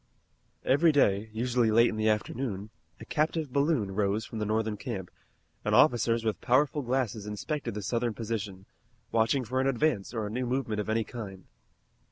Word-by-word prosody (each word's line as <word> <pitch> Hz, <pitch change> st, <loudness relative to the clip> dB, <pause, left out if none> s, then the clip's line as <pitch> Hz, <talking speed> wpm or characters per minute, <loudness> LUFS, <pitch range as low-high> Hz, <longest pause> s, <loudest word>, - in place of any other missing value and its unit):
Every 155 Hz, +5 st, +5 dB
day, 110 Hz, -7 st, +2 dB
usually 120 Hz, +1 st, +1 dB
late 115 Hz, +2 st, +5 dB
in -, -, -4 dB
the 110 Hz, 0 st, +2 dB
afternoon, 105 Hz, -1 st, -2 dB, 0.3 s
a 110 Hz, -, -9 dB
captive 155 Hz, 0 st, -1 dB
balloon 140 Hz, -8 st, +1 dB
rose 105 Hz, +2 st, 0 dB
from 110 Hz, -, -6 dB
the 105 Hz, -, -1 dB
Northern 110 Hz, 0 st, 0 dB
camp, 100 Hz, -4 st, -5 dB, 0.5 s
and -, -, +1 dB
officers 115 Hz, -1 st, +4 dB
with 110 Hz, -, -1 dB
powerful 135 Hz, +4 st, +2 dB
glasses 120 Hz, -5 st, -1 dB
inspected 105 Hz, +5 st, -3 dB
the 105 Hz, -, -4 dB
Southern 115 Hz, +1 st, -1 dB
position, 105 Hz, -4 st, -4 dB, 0.5 s
watching 115 Hz, +4 st, +2 dB
for 130 Hz, +4 st, 0 dB
an 135 Hz, -, +1 dB
advance 125 Hz, -5 st, +1 dB
or 110 Hz, -3 st, -2 dB
a 105 Hz, -, -5 dB
new 125 Hz, +2 st, -2 dB
movement 120 Hz, -4 st, -1 dB
of 105 Hz, -, -6 dB
any 110 Hz, +1 st, +1 dB
kind. 100 Hz, -6 st, -8 dB
115 Hz, 175 wpm, -29 LUFS, 105-130 Hz, 0.5 s, Every